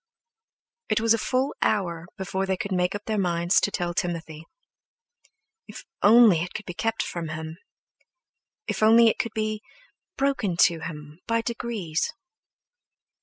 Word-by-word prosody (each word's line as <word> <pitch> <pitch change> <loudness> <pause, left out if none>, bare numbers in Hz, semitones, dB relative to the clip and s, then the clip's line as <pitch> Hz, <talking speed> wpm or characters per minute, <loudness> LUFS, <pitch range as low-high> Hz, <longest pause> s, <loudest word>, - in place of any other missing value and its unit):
It - - +2
was 225 0 +4
a 230 - 0
full 260 +4 0
hour 170 -5 0
before 190 0 -3
they 190 -1 0
could 200 - -5
make 180 +1 0
up 205 - -6
their 215 -2 -1
minds 175 -1 +2
to - - +1
tell 175 -3 -2
Timothy. 165 -3 -4 1.2
If - - -11 0.2
only 215 -5 +6
it 180 - -5
could 215 - -5
be 180 - -6
kept 225 +5 -1
from 170 -2 -5
him! 160 +1 -6 1.1
If - - -3
only 225 +1 +7
it - - -2
could 230 - -3
be 215 -1 -2 0.6
broken 265 -10 0
to 170 -1 +4
him 150 0 -8
by 230 0 +1
degrees! 225 -9 -3
190 Hz, 150 wpm, -25 LUFS, 170-225 Hz, 1.2 s, only